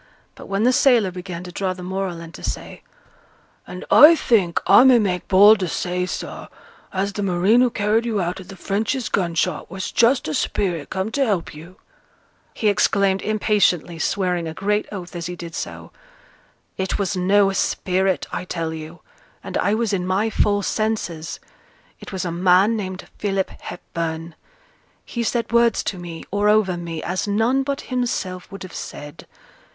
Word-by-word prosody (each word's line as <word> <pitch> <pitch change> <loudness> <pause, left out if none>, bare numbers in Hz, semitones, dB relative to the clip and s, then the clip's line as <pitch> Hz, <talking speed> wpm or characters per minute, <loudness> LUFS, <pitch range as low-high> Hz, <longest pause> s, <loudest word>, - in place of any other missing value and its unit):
But - - -12
when 195 +2 -1
the 250 +2 +4
sailor 240 -8 +4
began 180 -1 -7
to 180 - -9
draw 185 +1 -2
the 180 -1 -10
moral, 185 -2 -3
and 165 0 -10
to - - -11
say, - - -5 0.9
'And 180 - -8
I 310 +4 +9
think 200 - +2
I - - +7
may 260 -2 +7
make 185 -5 -1
bold 205 +3 +7
to 185 - -1
say, 180 +2 -2
sir, - - -6 0.4
as 195 +1 -1
th' - - -7
marine 195 +4 +3
who 250 - +4
carried 220 +2 0
you 220 -3 0
out 180 +1 -2
o' - - -9
th' 195 +1 -12
Frenchy's 215 +6 -2
gun 175 -4 -1
shot 165 -2 -1
was 190 +2 -5
just 245 - +3
a 155 - -2
spirit 175 -5 -1
come 190 +3 -3
to 280 - +1
help 200 -9 -1
you,' 165 +5 -12 0.8
he 215 - 0
exclaimed 195 -1 +2
impatiently, 200 -6 +1
swearing 180 -2 -1
a 160 - -6
great 210 +1 0
oath 185 -4 -7
as 170 -1 -4
he 180 - -5
did 170 -1 -8
so, - - -6 0.9
'It 190 0 -1
was 200 0 -1
no 195 +2 +3
spirit, 190 0 0
I - - -3
tell 165 -2 -3
you; 160 +2 -9 0.4
and - - -7
I 205 - +2
was 225 -2 -1
in 180 -2 -1
my 200 +4 +1
full 205 -1 +1
senses. 200 -7 -2 0.6
It - - -10
was 190 -2 -3
a 175 - -2
man 185 +5 +4
named 190 -3 -5
Philip 195 -2 -1
Hepburn. 165 -1 -5 0.7
He 235 - -4
said 230 0 -1
words 235 0 +3
to 190 - -3
me, 170 -2 -8
or 205 +1 +2
over 210 -4 +3
me, 170 -2 -6
as 185 +4 -2
none 225 +6 +2
but 275 0 -3
himself 235 -8 -3
would 195 - -8
have 185 - -10
said. 145 0 -8
190 Hz, 180 wpm, -21 LUFS, 180-210 Hz, 0.9 s, I